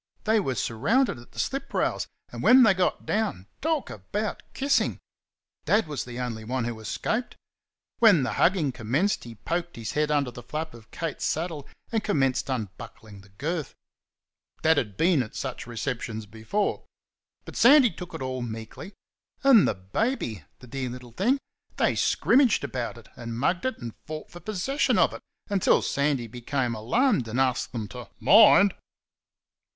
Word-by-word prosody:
They 220 +1 +3
were 135 -10 -1
surrounded 200 - +1
at 120 - -16
the - - -19
slip 275 0 -2
rails, - - 0 0.2
and - - -6
when 255 +1 +7
they 220 -4 +6
got 185 -1 0
down 205 - -1 0.2
talk 315 -1 -1
about 205 - -4
kissing! 275 +1 +1 0.7
Dad 215 0 +3
was 145 -3 -4
the 120 0 -7
only 115 -3 -4
one 125 +2 -2
who 115 -1 -4
escaped. 220 - -2 0.6
When 205 - +6
the 130 - -1
hugging 170 -6 +2
commenced 130 - 0
he 115 -1 -9
poked 170 - -3
his 115 -2 -5
head 150 0 0
under 145 -4 +1
the 120 - -10
flap 155 +6 -5
of 115 -1 -14
Kate's 165 -3 -4
saddle 160 -3 -2 0.2
and 225 -2 0
commenced 135 -9 +1
unbuckling 105 -3 -6
the 100 - -19
girth. 150 - -4 0.9
Dad 160 0 +5
had 105 -4 -5
been 165 -4 +3
at 110 - -7
such 130 -3 -5
receptions 115 -2 -4
before. 110 - -2 0.6
But - - -10
Sandy 260 -1 +7
took 180 -1 -9
it - - -5
all 130 -1 -3
meekly. 115 - -7 0.5
And 265 -7 +7
the - - 0
baby! 110 - -2 0.2
(the - - -11
dear 130 +1 -4
little 125 0 -9
thing) 225 - +2 0.4
they - - +3
scrimmaged 260 - +3
about 125 -4 -4
it, 115 -2 -14
and 115 -1 -6
mugged 170 - 0
it, 260 - -3
and 120 -3 -7
fought 155 0 -7
for 175 - -10
possession 215 - 0
of - - +4
it - - -8 0.3
until 200 -3 +3
Sandy 140 -3 0
became 120 +2 -2
alarmed 125 - +1
and 115 +4 -2
asked 130 -2 +1
them 110 -3 -4
to 125 -1 -9
"Mind!" 205 -1 +7
140 Hz, 165 wpm, -26 LUFS, -, 0.9 s, when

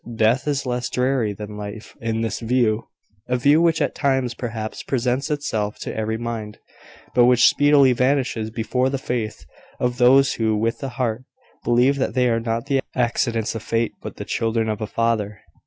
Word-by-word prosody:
Death 115 +5 +2
is 140 -2 0
less 125 0 -2
dreary 125 -4 0
than 105 +1 -8
life 105 +1 -8
in 115 -1 -1
this 115 -1 -2
view 115 -2 +1 0.4
a 125 - +1
view 145 +6 +4
which 165 -2 +3
at - - -1
times, 130 -4 0
perhaps, 115 -3 -5
presents 130 +2 -1
itself 110 -8 -2
to - - -6
every 110 0 -2
mind, 115 -2 -5 0.6
but 120 -1 +5
which 125 0 +6
speedily 145 -2 +5
vanishes 125 -3 0
before 125 +3 0
the 135 - -1
faith 120 -4 -4 0.3
of 125 0 -1
those 135 +2 +5
who, 110 -2 0
with 115 +2 -1
the 135 - -4
heart, 125 0 -1 0.4
believe 125 +4 +3
that 135 - -1
they 125 -1 +3
are 115 -1 +1
not 115 +1 -2
the 140 -1 +1 0.2
accidents 120 -2 0
of 115 - -5
Fate, 115 +1 -1
but - - -7
the - - -7
children 115 -1 -1
of 105 0 -3
a 110 - -2
Father. 110 -3 -1
120 Hz, 185 wpm, -22 LUFS, 110-130 Hz, 0.6 s, which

